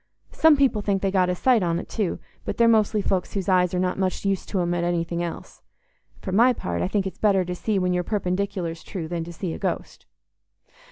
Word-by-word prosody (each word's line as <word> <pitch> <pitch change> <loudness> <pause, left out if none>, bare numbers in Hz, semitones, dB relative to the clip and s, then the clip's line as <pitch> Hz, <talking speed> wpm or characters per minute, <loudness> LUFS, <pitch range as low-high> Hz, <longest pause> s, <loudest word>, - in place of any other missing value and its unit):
Some 320 -12 +5
people 265 -6 +2
think 200 -1 -1
they 195 - +1
get 185 -2 +2
a 180 - 0
sight 245 +3 +3
on't 170 0 -1
too, 205 -6 -2 0.3
but - - -4
they're 235 - +5
mostly 215 -2 +3
folks 190 0 -1
whose 195 -3 -2
eyes 180 -2 +3
are - - 0
not 185 +1 -1
much 190 +1 -1
use 195 -2 -1
to 195 - -2
'em 175 0 0
at 175 0 -1
anything 170 0 -1
else. 170 -1 -6 0.6
For 190 - -4
my 235 +6 +5
part, 85 - -3
I - - +1
think 200 0 0
it's 190 - -6
better 195 -3 +3
to 180 - -3
see 205 +3 -1
when 180 -1 +1
your 180 0 0
perpendicular's 185 -4 -2
true 170 -4 -6
than 170 0 -3
to 170 - -8
see 170 0 -4
a - - -7
ghost." - - -4
185 Hz, 230 wpm, -24 LUFS, 175-205 Hz, 0.6 s, Some